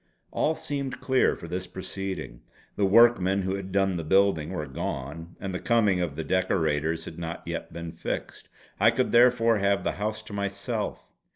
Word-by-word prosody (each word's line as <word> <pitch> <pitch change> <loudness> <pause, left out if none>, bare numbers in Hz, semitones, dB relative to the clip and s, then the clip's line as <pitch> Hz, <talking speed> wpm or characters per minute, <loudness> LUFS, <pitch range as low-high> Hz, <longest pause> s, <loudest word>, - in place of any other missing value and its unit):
All 160 - +1
seemed 140 -4 -4
clear 130 -1 +2
for 85 - -9
this 90 +2 -4
proceeding. 95 -8 -6 0.3
The 100 - +2
workmen 100 -3 +5
who 95 +1 -1
had 95 -1 -5
done 95 -1 +2
the 85 - -3
building 95 -2 +3
were 85 -5 -3
gone, 70 +5 -5
and 95 -1 -4
the 90 - -2
coming 105 -6 +2
of 80 -5 -2
the 80 - -3
decorators 80 -2 0
had 80 - -8
not 85 0 -5
yet - - -5
been 85 -1 -6
fixed. 80 - -5 0.3
I - - +6
could 120 +3 0
therefore 120 -2 +5
have 100 0 +2
the - - 0
house 110 +1 -2
to 110 - -10
myself. 100 +2 -3
95 Hz, 180 wpm, -27 LUFS, 85-110 Hz, 0.3 s, I